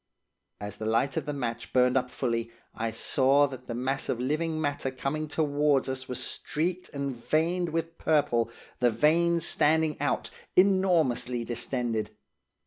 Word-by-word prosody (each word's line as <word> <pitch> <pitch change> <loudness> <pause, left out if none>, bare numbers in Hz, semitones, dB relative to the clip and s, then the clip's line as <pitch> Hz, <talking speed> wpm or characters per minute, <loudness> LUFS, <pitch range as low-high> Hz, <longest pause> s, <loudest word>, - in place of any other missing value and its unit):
"As 105 0 -6
the 110 - -4
light 125 +5 +1
of - - -2
the - - -1
match 120 -4 -4
burned 125 0 +4
up 125 -1 +1
fully, 115 -3 -2 0.2
I 115 0 -2
saw 135 +5 +3
that 130 -2 -8
the 120 - -4
mass 130 +3 -2
of 120 - -1
living 155 +5 -1
matter 145 -3 -1
coming 135 +4 -3
towards 145 -2 +1
us 130 0 -4
was 125 -1 -4
streaked 175 +4 -2
and 140 -2 -3
veined 170 +3 +1
with 165 +1 -3
purple, 120 -7 +2 0.3
the 125 -1 +4
veins 165 +7 +3
standing 155 -1 +2
out, 145 - -1 0.2
enormously 175 -11 +3
distended. 120 -1 -2
135 Hz, 150 wpm, -28 LUFS, 125-155 Hz, 0.3 s, burned